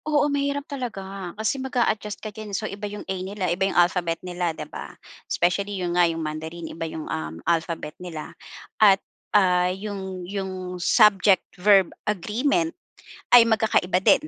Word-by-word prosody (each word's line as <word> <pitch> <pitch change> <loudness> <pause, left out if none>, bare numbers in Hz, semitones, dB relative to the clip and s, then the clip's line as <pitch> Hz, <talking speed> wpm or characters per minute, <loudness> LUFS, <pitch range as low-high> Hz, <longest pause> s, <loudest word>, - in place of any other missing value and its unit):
Oo, 295 -1 +2
mahirap 280 0 -1
talaga. 195 -9 -6
Kasi 220 +5 -1
mag-a-adjust 235 -6 -1
ka 215 - -5
din. 210 -1 -5
So, 215 - -4
iba 205 0 -5
yung 205 0 -8
"A" 190 - -3
nila, 190 +1 -3
iba 190 +2 +1
yung - - -3
alphabet 175 -1 +3
nila, 175 -1 -1
di 160 - -5
ba? - - -9 0.3
Especially, 195 +3 0
yun 175 -2 -2
nga 175 -1 +4
yung 165 -1 -3
Mandarin. 160 +2 -5
Iba 165 0 -4
yung, 160 -1 -6
um, 80 0 -4
alphabet 165 -2 -1
nila 165 -4 -7 0.5
at, 200 -3 +8 0.4
ah, 180 -2 +3
yung 190 -2 -5
yung 185 -2 -4
subject 200 0 +5 0.2
verb 195 -2 +5 0.2
agreement 255 - 0 0.6
ay 245 -1 +9
magkakaiba 220 -5 +2
din, 240 - +5
190 Hz, 160 wpm, -24 LUFS, 175-215 Hz, 0.6 s, ay